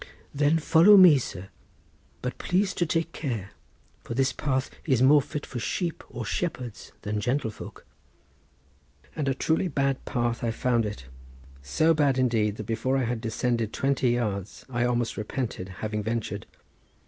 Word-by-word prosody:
"Then 145 +3 +3
follow 170 +6 +6
me, 175 -7 +8
sir; 95 -5 -7 0.7
but 125 0 -4
please 190 +2 +1
to 175 - 0
take 165 +1 0
care, 115 - -4 0.5
for 115 - -5
this 130 0 +2
path 130 -3 -1
is 130 -5 +2
more 145 +2 +7
fit 145 +2 -6
for 125 - -6
sheep 165 - -2
or - - -6
shepherds 125 - -4
than 105 0 -2
gentlefolk." 120 -2 -3 1.3
And 145 - -2
a 135 - +1
truly 160 +6 +1
bad 140 -4 0
path 120 -3 -1
I 115 - +1
found 115 -1 +1
it; 105 -12 -7 0.6
so 155 - +2
bad 145 -4 +2
indeed 115 -5 +1
that 110 - -7
before 130 +5 0
I 135 - +1
had 120 -1 -2
descended 115 -1 -1
twenty 135 -2 +1
yards 105 -5 -2
I 120 0 +1
almost 120 -1 0
repented 105 -3 -4 0.2
having 105 0 -2
ventured. 110 -2 -3
125 Hz, 155 wpm, -27 LUFS, 110-145 Hz, 1.3 s, me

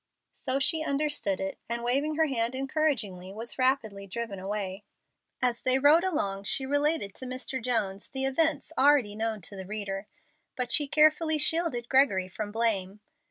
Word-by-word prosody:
So 260 0 -1
she 315 +4 +4
understood 285 -9 -1
it, 190 0 -4
and 235 0 -3
waving 280 +6 0
her 320 +1 +3
hand 240 -3 -1
encouragingly, 260 - -1
was 230 +5 -7
rapidly 225 -7 0
driven 210 -1 -5
away. 195 0 -4 0.6
As 245 -2 0
they 255 0 +3
rode 295 +5 +5
along 200 - -1
she 265 - +4
related 290 -6 0
to 260 - -8
Mr. 255 +1 -4
Jones 210 -5 -1
the 265 0 -2
events 315 +4 0
already 275 -8 +4
known 220 -1 -2
to 200 - -5
the 190 -1 -8
reader, 200 -1 -4 0.5
but 245 -2 +2 0.2
carefully 310 +1 +4
shielded 305 -6 +1
Gregory 255 -9 +3
from 205 +3 -6
blame. 210 -3 0
245 Hz, 160 wpm, -28 LUFS, 205-285 Hz, 0.6 s, rode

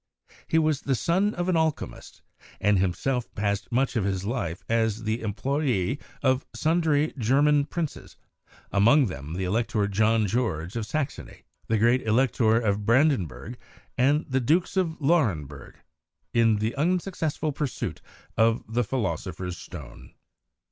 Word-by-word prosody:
He 160 - +1
was 155 -3 +2
the 135 - 0
son 185 - +1
of 175 0 -2
an 185 - +2
alchemist, 160 - -2 0.4
and 105 -1 +3
himself 120 +7 -1
passed 100 +1 -2
much 130 +2 +1
of 110 - +1
his 95 -1 -2
life 95 -8 -3
as 115 -1 0
the 110 +2 -1
employee 120 +1 -1 0.2
of 130 0 +2
sundry 155 -2 +1
German 140 +5 +3
princes 160 -1 -5 0.5
(among 120 +9 +5
them 75 - -6
the 95 - -2
Elector 105 +1 0
John 110 +2 +2
George 95 -5 -2
of 115 -2 -3
Saxony, 150 +2 -4 0.2
the 115 - +1
great 120 +4 +3
Elector 115 -1 +2
of 105 -3 0
Brandenburg, 120 - +1 0.4
and 145 +5 +2
the 130 -1 +1
Dukes 165 +11 +1
of 170 -4 0
Lauenburg) 100 - 0 0.6
in 115 -2 +4
the 110 +3 -1
unsuc 180 +4 0
cessful 155 -1 -2
pursuit 140 -3 -4 0.3
of 115 0 +2
the 115 +3 0
Philosopher's 95 -7 -3
Stone. 65 -5 -11
120 Hz, 140 wpm, -26 LUFS, 105-145 Hz, 0.6 s, among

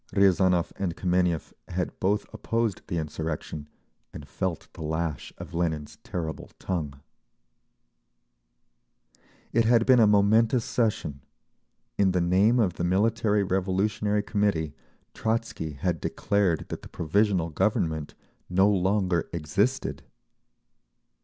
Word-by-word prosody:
Riazanov 95 -3 +3
and 90 -4 -2
Kameniev 90 -3 0
had 90 0 -3
both 100 +3 +1
opposed 115 -4 -1
the 85 - -2
insurrection, 75 -1 -4 0.4
and 70 - -9
felt 95 -1 -3
the - - -10
lash 80 -2 -3
of - - -9
Lenin's 80 -3 -2
terrible 80 -3 -5
tongue…. 75 -7 -3 2.5
It 115 0 +3
had 115 0 +4
been 130 -2 +6
a 110 - +6
momentous 110 +4 +4
session. 100 - -1 0.8
In 95 -2 +4
the 90 - +2
name 95 +7 +3
of 95 -7 +1
the - - -2
Military 105 +3 +2
Revolutionary 100 +2 0
Committee 100 -8 0 0.4
Trotzky 110 -9 -2
had 85 +2 -2
declared 100 -5 0
that - - -5
the - - -11
Provisional 90 0 +1
Government 80 -4 0 0.3
no 95 +2 +4
longer 95 -2 +1
existed. 100 - -1
95 Hz, 115 wpm, -27 LUFS, 80-105 Hz, 2.5 s, been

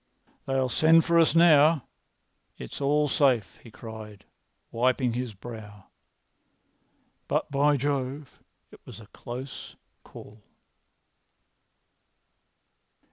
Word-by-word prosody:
"They'll 135 -1 0
send 160 +6 +4
for 170 -1 +3
us 165 0 +3
now. 160 -3 +5 0.7
It's 65 - -9
all 150 +2 +2
safe," 130 -7 +1
he 115 - -14
cried, 110 -2 -11 0.5
wiping 125 +1 0
his 120 -3 -5
brow. 105 -2 -11 1.4
"But, - - -2
by 145 +1 +2
Jove, 140 +1 -4 0.3
it - - -16
was - - -12
a 110 - -13
close 125 +5 -9 0.3
call!" 105 +1 -14
130 Hz, 95 wpm, -26 LUFS, 115-145 Hz, 1.4 s, now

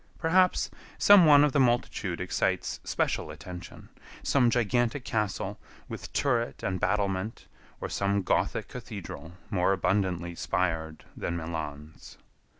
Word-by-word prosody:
Perhaps 180 +2 +3 0.3
some 200 -5 +7
one 145 -1 +8
of 150 - +3
the 145 - +2
multitude 120 -7 +1
excites 90 - -1
special - - -1
attention, 90 -1 -10 0.3
some 125 -4 +3
gigantic 120 +2 +1
castle 105 -2 -2 0.3
with - - -7
turret 120 -4 0
and 95 -1 -1
battlement, 100 0 -1 0.3
or - - -4
some 100 0 0
Gothic - - 0
cathedral 100 - -8 0.2
more 95 -1 +2
abundantly 90 -2 0
spired 80 -2 -2
than 85 - -3
Milan's. 80 -2 -7
100 Hz, 120 wpm, -28 LUFS, 85-120 Hz, 0.3 s, one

